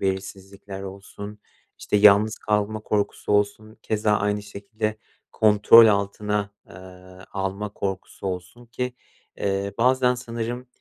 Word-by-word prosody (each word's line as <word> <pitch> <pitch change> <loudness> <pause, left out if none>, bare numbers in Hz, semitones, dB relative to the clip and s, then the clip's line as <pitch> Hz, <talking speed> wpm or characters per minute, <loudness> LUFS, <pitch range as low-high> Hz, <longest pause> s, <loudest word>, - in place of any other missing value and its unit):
belirsizlikler 95 0 -5
olsun, 100 +2 -9 0.4
işte, - - -1
yalnız 105 +1 +5
kalma 105 0 -1
korkusu 105 -1 -2
olsun, 105 +1 0
keza 105 -1 0
aynı 105 0 0
şekilde 105 +2 -4 0.4
kontrol 110 +1 +7
altına, 105 0 0 0.2
eee, - - -14 0.6
alma 100 +1 -3
korkusu 95 0 -5
olsun 95 +6 -6
ki, 125 +2 -4 0.4
eee, 100 0 -2
bazen 125 +1 +3
sanırım, 120 +1 -5
105 Hz, 110 wpm, -24 LUFS, 100-110 Hz, 0.6 s, kontrol